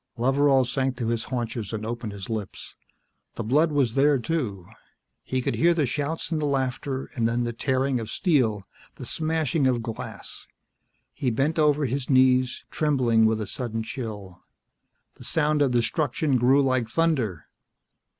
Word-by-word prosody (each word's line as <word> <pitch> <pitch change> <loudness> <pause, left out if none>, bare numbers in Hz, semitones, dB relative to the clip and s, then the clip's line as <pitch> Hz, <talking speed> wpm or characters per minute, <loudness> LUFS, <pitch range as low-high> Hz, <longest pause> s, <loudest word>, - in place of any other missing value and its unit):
Loveral 135 +2 +3
sank 130 +1 -1
to 115 -2 -2
his 115 -2 -1
haunches 115 -5 -4
and 110 -1 -4
opened 115 -1 -4
his 100 -2 -8
lips. 110 -3 -6 0.6
The 115 - -3
blood 150 +8 +3
was 135 -6 +1
there, 140 +2 +4
too. 120 - -3 0.6
He 130 -1 -2
could - - 0
hear 170 +1 +3
the 155 -4 +2
shouts 150 +6 -3
and 155 -2 0
the 150 - 0
laughter, 135 0 -2
and 115 -6 +1
then 120 +1 0
the 120 0 -2
tearing 130 +2 0
of 110 -1 -6
steel, 125 - +1 0.3
the - - -8
smashing 160 -2 0
of 120 -3 0
glass. 115 -1 -7 0.7
He 130 - -1
bent 140 +8 0
over 150 -1 +3
his 130 +1 -3
knees, 130 -1 +3
trembling 125 -7 +3
with 110 0 +1
a 110 - -2
sudden 115 +1 -4
chill. 105 -6 -7 0.8
The - - -12
sound 150 -2 +1
of 140 - +4
destruction 130 +3 +1
grew 130 +4 +4
like 130 -4 0
thunder. 120 - 0
130 Hz, 160 wpm, -25 LUFS, 115-145 Hz, 0.8 s, there